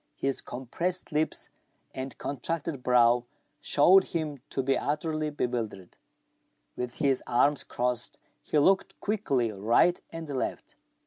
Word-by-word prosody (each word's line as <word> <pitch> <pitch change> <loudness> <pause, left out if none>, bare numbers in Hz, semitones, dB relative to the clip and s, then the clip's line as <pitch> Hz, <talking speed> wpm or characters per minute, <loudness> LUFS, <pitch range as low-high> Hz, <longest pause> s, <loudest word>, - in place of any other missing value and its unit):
His 135 -1 0
compressed 170 +9 -2
lips 155 +1 0 0.4
and 130 +1 -6
contracted 145 +1 -3
brow 120 -1 +4 0.3
showed 185 +6 +5
him 155 -4 -3
to 135 - -2
be 135 +1 +2
utterly 155 +1 -1
bewildered. 120 -9 -3 0.8
With 125 0 -4
his 135 -2 +1
arms 140 +4 +3
crossed, 120 0 -2 0.2
he - - -1
looked 190 +6 +3
quickly 140 - 0
right 115 - +3
and 165 -1 -6
left. 135 -3 -4
140 Hz, 120 wpm, -28 LUFS, 125-160 Hz, 0.8 s, showed